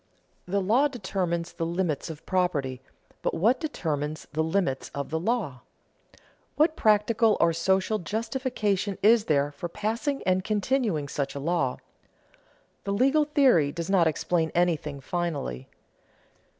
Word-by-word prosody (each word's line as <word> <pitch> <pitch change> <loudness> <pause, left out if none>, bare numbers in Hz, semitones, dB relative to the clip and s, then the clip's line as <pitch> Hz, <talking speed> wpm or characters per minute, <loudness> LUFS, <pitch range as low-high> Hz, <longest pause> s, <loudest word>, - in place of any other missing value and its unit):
The 200 +2 0
law 240 +9 +4
determines 185 -9 -3
the - - -4
limits 170 -2 -1
of 160 0 -9
property, 145 -9 0 0.4
but - - -1
what 225 +10 +3
determines 155 - -3
the 160 +1 +1
limits 160 -5 -1
of 140 0 -4
the 160 - 0
law? 180 - -2 0.9
What 310 +1 +3
practical 215 0 +3
or 170 0 +4
social 190 +5 +1
justification 215 -1 -2
is 220 +1 +5
there 145 -1 +1
for 160 +4 -6
passing 230 - -2
and 185 0 +2
continuing 210 - 0
such 140 -1 -3
law? 140 -2 0 1.1
The 200 - -2
legal 275 +8 +3
theory 265 - +4
does 170 +4 -4
not 180 -4 +4
explain 160 +1 0
anything 155 -5 0
finally. 145 - -3
180 Hz, 130 wpm, -27 LUFS, 155-215 Hz, 1.1 s, is